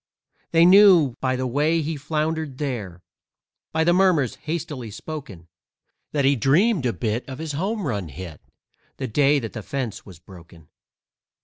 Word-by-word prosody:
They 165 Hz, 0 st, +5 dB
knew 180 Hz, -, +6 dB
by 130 Hz, -1 st, 0 dB
the 130 Hz, 0 st, -2 dB
way 150 Hz, +6 st, +1 dB
he 160 Hz, +2 st, -3 dB
floundered 155 Hz, -1 st, -3 dB
there, 110 Hz, -, -5 dB, 0.7 s
By 160 Hz, 0 st, +1 dB
the 175 Hz, +1 st, +3 dB
murmurs 175 Hz, -, +3 dB
hastily 150 Hz, -6 st, -5 dB
spoken, 110 Hz, -, -8 dB, 0.6 s
That 140 Hz, -2 st, 0 dB
he 140 Hz, +1 st, +4 dB
dreamed 150 Hz, -, +2 dB
a -, -, +1 dB
bit 115 Hz, +1 st, -2 dB
of 130 Hz, -, -6 dB
his 160 Hz, 0 st, -5 dB
home 195 Hz, +7 st, -2 dB
run 100 Hz, -, -2 dB
hit 80 Hz, +1 st, -9 dB, 0.6 s
The 130 Hz, -, -3 dB
day 145 Hz, +5 st, +3 dB
that 115 Hz, -5 st, -5 dB
the 110 Hz, -, -6 dB
fence 125 Hz, -1 st, -5 dB
was 95 Hz, -5 st, -13 dB
broken. 85 Hz, -3 st, -16 dB
140 Hz, 155 wpm, -23 LUFS, 110-160 Hz, 0.7 s, knew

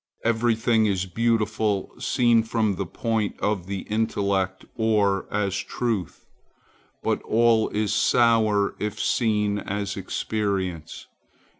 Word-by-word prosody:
Every 115 Hz, 0 st, +2 dB
thing 110 Hz, -1 st, +2 dB
is 95 Hz, -2 st, 0 dB
beautiful 110 Hz, 0 st, 0 dB
seen 120 Hz, -2 st, +3 dB
from 110 Hz, -2 st, 0 dB
the 95 Hz, 0 st, -4 dB
point 110 Hz, +1 st, -2 dB
of 100 Hz, -3 st, -1 dB
the 100 Hz, -1 st, -3 dB
intellect, 100 Hz, -3 st, -1 dB
or 105 Hz, -4 st, +1 dB
as 100 Hz, -2 st, 0 dB
truth. 110 Hz, -9 st, -3 dB, 0.8 s
But -, -, 0 dB
all 115 Hz, 0 st, +3 dB
is 105 Hz, -1 st, -1 dB
sour, 110 Hz, -4 st, +3 dB
if 105 Hz, -1 st, -3 dB
seen 105 Hz, -3 st, +1 dB
as 100 Hz, 0 st, -3 dB
experience. 95 Hz, -4 st, -3 dB
105 Hz, 115 wpm, -24 LUFS, 100-115 Hz, 0.8 s, seen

